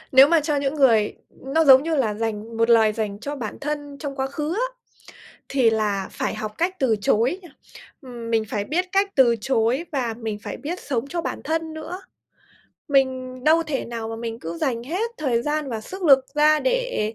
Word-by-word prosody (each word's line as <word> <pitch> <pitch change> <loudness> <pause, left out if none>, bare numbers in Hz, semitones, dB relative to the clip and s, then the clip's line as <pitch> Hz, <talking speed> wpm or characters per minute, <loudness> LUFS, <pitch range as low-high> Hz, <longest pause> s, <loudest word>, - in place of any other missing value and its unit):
Nếu 270 +2 +8
mà 335 -1 +4
cho 300 -1 -1
những 280 +1 -1
người 230 -7 +3 0.2
nó 310 +5 -1
giống 265 -1 +8
như 325 0 -1
là 220 -6 +1
dành 225 0 -4
một 230 +1 +2
lời 220 -2 +5
dành 210 -2 -3
cho 290 +1 -5
bản 225 -6 -6
thân 290 -1 -4
trong 280 -2 -5
quá 265 -1 -1
khứ 300 +4 -3
á, - - -4 0.6
thì 260 -4 +3
là 210 -3 -1
phải - - -3
học 215 0 -5
cách 360 +3 0
từ 245 -5 +2
chối, 235 - +2 0.6
ừm, 240 -4 -8
mình 225 -1 +2
phải 205 -1 -2
biết 350 - 0
cách 395 0 +2
từ 240 -4 +5
chối 250 +6 +1
và 250 -6 -1
mình 220 -3 -4
phải - - -6
biết 340 +5 -5
sống 265 -3 -2
cho 345 - -2
bản - - -4
thân 320 +1 -2
nữa. 350 +4 -7 0.9
Mình 260 -2 0
đâu 320 +2 +5
thể 300 -4 -3
nào 230 -1 -5
mà 225 - -5
mình 230 0 -5
cứ 165 +1 -6
dành 235 +1 -1
hết 370 - -2
thời 245 -6 0
gian 300 0 -1
và 225 - -3
sức 375 - -9
lực 270 -5 +6
ra 305 +1 +4
để - - -1
265 Hz, 205 wpm, -23 LUFS, 225-310 Hz, 0.9 s, Nếu